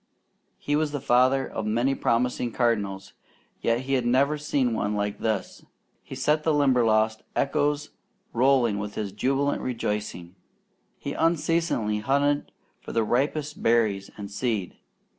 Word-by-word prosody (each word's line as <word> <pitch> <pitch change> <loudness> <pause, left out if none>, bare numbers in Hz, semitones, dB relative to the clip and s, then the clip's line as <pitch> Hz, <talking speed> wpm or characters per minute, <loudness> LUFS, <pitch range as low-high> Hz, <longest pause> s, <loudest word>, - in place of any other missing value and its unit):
He 145 - -1
was 150 -1 0
the 145 - -1
father 130 +1 +3
of 110 - -4
many 120 +5 +1
promising 125 -1 0
cardinals, 100 -6 -1 0.5
yet 115 +1 +1
he 135 0 0
never 130 +5 +2
had - - -12
seen 135 -5 +1
one 105 -1 -1
like 105 0 -2
this. 110 -4 -2 0.4
He - - -9
set 150 +4 +1
the 155 -1 +1
Limberlost 115 -6 +3
echoes 145 +1 0 0.4
rolling 120 -4 +3
with 105 0 -5
his 105 -2 -3
jubilant 135 +7 0
rejoicing. 105 -7 -3 0.6
He 140 - -5
unceasingly 165 -9 +1
hunted 140 +5 +1 0.3
for - - -9
the 115 - +2
ripest 145 +6 -1
berries 110 -4 +2
and 100 -1 -7
seed. 105 -3 -2
125 Hz, 140 wpm, -26 LUFS, 105-140 Hz, 0.6 s, father